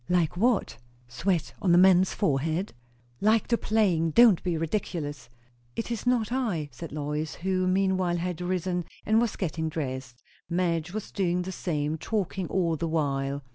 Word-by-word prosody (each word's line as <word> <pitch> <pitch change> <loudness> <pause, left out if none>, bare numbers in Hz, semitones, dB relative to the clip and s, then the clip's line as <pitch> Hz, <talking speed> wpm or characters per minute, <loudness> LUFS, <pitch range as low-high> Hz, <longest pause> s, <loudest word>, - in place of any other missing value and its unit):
"Like 175 -3 +2
what? 220 - +1 0.3
sweat 170 +7 -1
on 175 -3 +4
a - - +6
man's 185 0 +6
forehead?" 160 +3 0 0.5
"Like 215 +1 +2
the 235 - +4
playing. 185 -7 +2
Don't 225 +1 +6
be 175 -2 -1
ridiculous." 155 - -3 0.5
"It 230 - -3
is 235 +1 -3
not 235 -3 +2
I," 210 - -1
said 165 - -8
Lois, 150 +1 -3
who 185 +1 0
meanwhile 185 -2 +1
had 180 0 -3
risenn 180 -1 -1 0.2
and 220 +2 +4
was 235 -3 0
getting 160 -3 -2
dressed. 130 -5 -5 0.3
Madge 170 -1 0
was 215 +1 -5
doing 180 -2 0
the 190 - -5
same, 155 -4 -2
talking 195 -3 -2
all 170 -4 +1
the 165 +2 -2
while. 140 -3 -1
175 Hz, 160 wpm, -27 LUFS, 160-195 Hz, 0.5 s, a